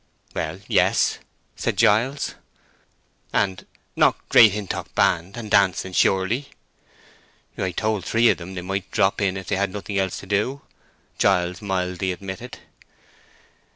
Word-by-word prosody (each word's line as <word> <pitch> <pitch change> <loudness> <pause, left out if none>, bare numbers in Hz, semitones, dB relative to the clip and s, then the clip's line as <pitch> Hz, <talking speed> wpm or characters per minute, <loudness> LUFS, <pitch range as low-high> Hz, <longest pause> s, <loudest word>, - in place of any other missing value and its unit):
"Well, - - -4
yes," - - +2 0.4
said - - -2
Giles. 125 +7 +2 1.0
"And—not 95 -2 -1
Great 110 - +8
Hintock 105 -2 -5
band, 90 +5 +1
and 110 -3 -7
dancing, 95 -1 +2
surely?" 95 +10 +1 1.1
"I 95 - -2
told 105 +2 -1
three 115 +5 +3
of - - +1
'em 95 +3 -8
they 90 - -5
might 95 +1 -3
drop 95 +2 +1
in 95 -1 0
if 95 - -7
they'd 100 +2 0
nothing 100 0 -4
else 95 -2 -1
to - - -11
do," 105 +8 -1 0.6
Giles 90 -2 +2
mildly 95 -2 -2
admitted. 95 +6 -7
95 Hz, 125 wpm, -23 LUFS, 95-105 Hz, 1.1 s, Great